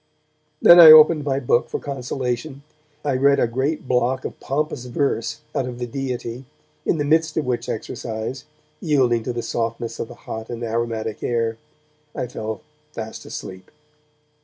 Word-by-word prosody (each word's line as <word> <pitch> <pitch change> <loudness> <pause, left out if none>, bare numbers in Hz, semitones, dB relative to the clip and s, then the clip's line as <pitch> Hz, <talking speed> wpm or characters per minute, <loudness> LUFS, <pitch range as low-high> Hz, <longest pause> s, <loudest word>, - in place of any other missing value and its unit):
Then 175 - +9
I 165 -2 +12
opened 155 0 +8
my 135 -1 0
book 120 -2 +1
for - - -3
consolation, 135 +1 -4 0.4
and 145 - 0
I 130 - -1
read 140 0 +4
a - - +3
great 130 +5 -2
block 125 +1 0
of - - -6
pompous 140 -2 -2
verse 120 -3 -2
out 130 - -1
of 125 -1 -6
'The 125 - -3
Deity', 125 -1 -5 0.4
in - - +2
the 145 - -1
midst 160 +2 +2
of 155 - 0
which 125 -1 -2
exercise, 115 +3 -5 0.3
yielding 130 - +2
to 125 - -3
the 120 -1 -4
softness 115 0 -3
of - - -3
the - - -11
hot 110 0 -6
and 120 0 -5
aromatic 115 -1 -3
air, 115 -1 -1 0.6
I - - -2
fell 110 -3 -6 0.3
fast 110 0 -7
asleep. 95 0 -8
125 Hz, 165 wpm, -22 LUFS, 115-140 Hz, 0.6 s, I